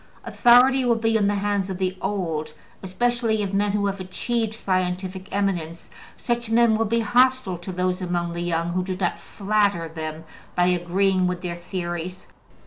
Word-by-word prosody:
Authority 255 +2 +5
will 240 -2 +3
be 225 0 0
in 205 -2 +3
the 205 - +1
hands 200 -1 -1
of 190 - -4
the 185 0 -1
old, 175 -6 -2 0.3
especially 225 +2 0
of 200 -1 -4
men 200 0 +1
who 205 -1 +1
have 195 -1 -2
achieved 220 +4 -2
scientific 185 -1 -2
eminence; 175 -5 -2 0.3
such 240 -1 -2
men 230 -1 +4
will 225 +1 +1
be 230 +2 +1
hostile 245 -4 +2
to 175 +2 -7
those 180 0 -1
among 175 -1 -2
the 170 - -4
young 170 -1 -1
who 180 +1 -1
do 185 0 -3
not 180 -2 -1
flatter 200 -4 0
them 160 0 -6 0.3
by 180 - +3
agreeing 180 +1 +2
with 180 0 -3
their 175 -1 -4
theories. 175 0 -5
190 Hz, 175 wpm, -23 LUFS, 180-220 Hz, 0.3 s, Authority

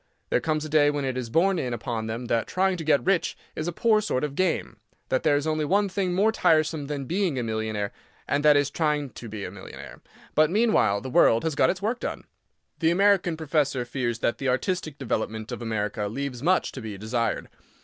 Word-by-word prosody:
There - - +2
comes 155 -1 -1
a - - -4
day 150 -1 +4
when 145 -1 -1
it 130 -1 -2
is 125 -2 -4
borne 180 +7 +2
in 125 -4 -2
upon 115 -2 -4
them 115 +2 -4
that 115 -1 0
trying 190 0 +1
to 165 - -5
get 145 -5 +2
rich 195 -3 +1 0.2
is 155 - -3
a - - 0
poor 215 +4 +3
sort 150 -11 -1
of 150 -2 -2
game—that 130 - -2
there 150 -2 +3
is 145 +1 0
only 155 -1 0
one 200 +6 +2
thing 185 -1 -1
more 210 +4 +3
tiresome 155 -7 +2
than 140 -2 -4
being 175 -2 0
a 125 - -1
millionaire, 110 -2 -2 0.4
and 140 +2 0
that 150 -1 +6
is 145 0 +1
trying 150 -4 0
to 115 +1 -9
be 105 -1 -5
a - - -6
millionaire. 65 -10 -11 0.3
But, 155 0 +4
meanwhile, 205 - +2
the 130 - -6
world 115 -2 +5
has 160 - 0
got - - +3
its 190 +1 -2
work 235 +4 0
done. - - -4 0.6
The 160 - +3
American 185 -2 +3
professor 145 -5 0
fears 120 -2 -2
that 115 - 0
the 135 - 0
artistic 155 +3 -1
development 110 -4 -3
of - - -5
America 105 -1 -2
leaves 125 +2 -4
much 180 +3 +2
to 130 - -8
be 110 -3 -6
desired. 115 +2 -2
145 Hz, 220 wpm, -26 LUFS, 115-170 Hz, 0.6 s, that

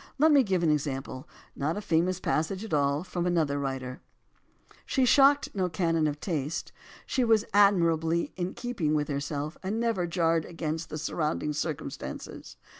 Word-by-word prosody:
Let 310 +3 +5
me 285 -2 +7
give 190 -7 0
an 160 - +4
example, 135 -3 -3 0.3
not 155 +7 -1
a - - -1
famous 180 0 +1
passage 185 +7 -1
at 215 - -7
all, 145 +1 +2
from 180 -1 -3
another 155 -5 +1
writer: 130 -2 -4 0.8
She 265 -2 +1
shocked 280 +2 +5
no 185 -2 0
canon 165 -2 +1
of 145 0 -3
taste; 155 -4 -3 0.3
she 255 - 0
was 225 -2 +3
admirably 170 -5 +3
in 180 0 -3
keeping 205 -12 -1
with 150 -1 0
herself, 145 +2 -3
and 200 +4 -2
never 230 -7 0
jarred 165 -2 +1
against 160 -1 -4
surrounding 150 -1 -2
circumstances. 150 -2 -5
165 Hz, 155 wpm, -28 LUFS, 150-190 Hz, 0.8 s, me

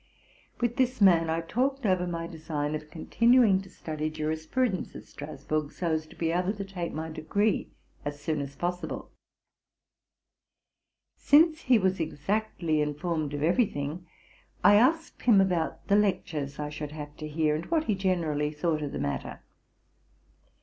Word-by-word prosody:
With 240 0 0
this 255 -1 +1
man 170 -5 +5
I 165 +1 0
talked 260 +9 -1
over 185 -2 +2
my 170 -1 -3
design 155 -3 -3
of 155 0 -5
continuing 230 +4 +4
to 195 - -12
study 155 -3 -4
jurisprudence 160 +8 -2
at - - -9
Strasburg, 145 +1 -4
so 170 -2 -2
as 155 0 -1
to - - -15
be 165 -1 -1
able 180 +3 0
to 200 -1 -5
take 180 -3 -4
my 160 +1 -4
degree 200 +7 0 0.3
as 145 0 -4
soon 150 0 -1
as 140 0 -6
possible. 175 -1 -4 2.0
Since 315 +2 +4
he 255 -2 +4
was 190 -2 +1
exactly 165 0 -1
informed 150 0 -2
of 145 - -4
eyery 185 +8 +3
thing, 150 +5 -5 0.6
I 205 - +8
asked 295 +10 +3
him 225 -5 +5
about 180 -4 0
the 200 - +4
lectures 155 -9 0
I 150 0 -3
should 150 0 -6
have 150 -1 -8
to 155 - -6
hear, 155 0 +1
and 155 - -4
what 320 -2 +1
he 220 - 0
generally 170 -6 0
thought 155 +1 -1
of 145 -2 -4
the - - -3
matter. 70 - -3
165 Hz, 160 wpm, -28 LUFS, 155-200 Hz, 2.0 s, I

